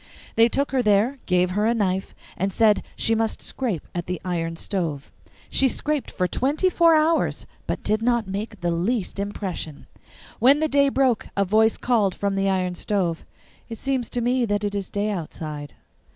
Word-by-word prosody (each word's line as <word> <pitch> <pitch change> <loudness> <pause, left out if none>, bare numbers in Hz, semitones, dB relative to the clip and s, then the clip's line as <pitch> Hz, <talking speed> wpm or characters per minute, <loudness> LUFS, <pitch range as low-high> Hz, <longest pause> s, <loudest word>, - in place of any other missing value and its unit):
They 230 +1 +6
took 280 +4 0
her 265 -2 +2
there, 220 +5 +2
gave 180 0 +2
her 210 +3 +1
a 235 - +2
knife, 190 -3 -1 0.2
and 195 +2 -1
said 215 +1 +4
she 225 - +1
must 225 0 0
scrape 225 - -3
at 175 -1 -4
the 180 0 -3
iron 165 -2 -2
stove. 165 -6 -3 0.4
She 270 - +4
scraped 300 0 -1
for 180 - -1
twenty 295 - +1
four 335 -2 +5
hours, 315 +1 +2 0.2
but - - -3
did 215 +1 +1
not 235 -1 +2
make 205 +1 -5
the 175 0 0
least 195 +4 -1
impression. 190 -7 -4 0.5
When 275 +4 +6
the 315 - +2
day 280 -1 +3
broke, 260 -4 +1
a 200 - +3
voice 220 +3 +3
called 220 -6 +1
from 200 -1 -1
the 195 0 +1
iron 185 -1 0
stove, 180 -3 -1 0.5
'It 225 - -6
seems 260 -1 -1
to 245 - -2
me 250 +1 +1
that 205 -1 -1
it 205 0 -1
is 200 -2 -3
day 210 +1 -1
outside. 155 -5 -6
210 Hz, 185 wpm, -24 LUFS, 185-245 Hz, 0.5 s, They